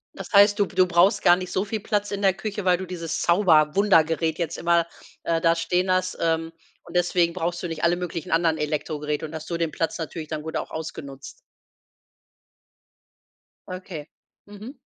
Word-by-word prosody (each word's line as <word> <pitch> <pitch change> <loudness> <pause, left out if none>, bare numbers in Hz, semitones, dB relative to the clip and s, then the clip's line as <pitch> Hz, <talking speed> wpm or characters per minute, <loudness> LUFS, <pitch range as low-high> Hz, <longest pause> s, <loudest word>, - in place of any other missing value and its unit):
Das - - -9
heißt, 205 +1 +6
du 205 - +4
b - - -16
du 185 0 +4
brauchst 175 +4 +3
gar 175 - +6
nicht 185 0 -6
so 190 - -1
viel 215 +1 -3
Platz 205 -1 -1
in 200 0 -3
der 190 -2 +4
Küche, 205 +1 -5
weil 180 -1 +4
du 190 - -6
dieses 170 -3 -4
Zauber-Wunder-Gerät 165 -2 +3
jetzt 170 -1 -2
immer, 170 0 +2 0.4
äh, 165 -1 0
da 165 0 +3
stehen 180 +2 0
hast. 185 0 0
Ähm, 165 0 0 0.3
und - - -13
deswegen 175 -1 +2
brauchst 175 -1 -3
du 175 - -3
nicht 165 -1 -6
alle 170 +1 +3
möglichen 175 -3 -5
anderen 165 -1 +2
Elektrogeräte 150 0 -3
und 160 +1 -8
hast 160 0 -7
so 170 - -3
den 165 -2 -1
Platz 165 +1 -2
natürlich 160 0 -6
dann 155 0 -4
gut 160 +1 -4
auch - - -5
ausgenutzt. 140 -4 -8 2.3
Okay, 185 -4 -8 0.4
mhm. 210 +6 -10
170 Hz, 185 wpm, -24 LUFS, 160-185 Hz, 2.3 s, heißt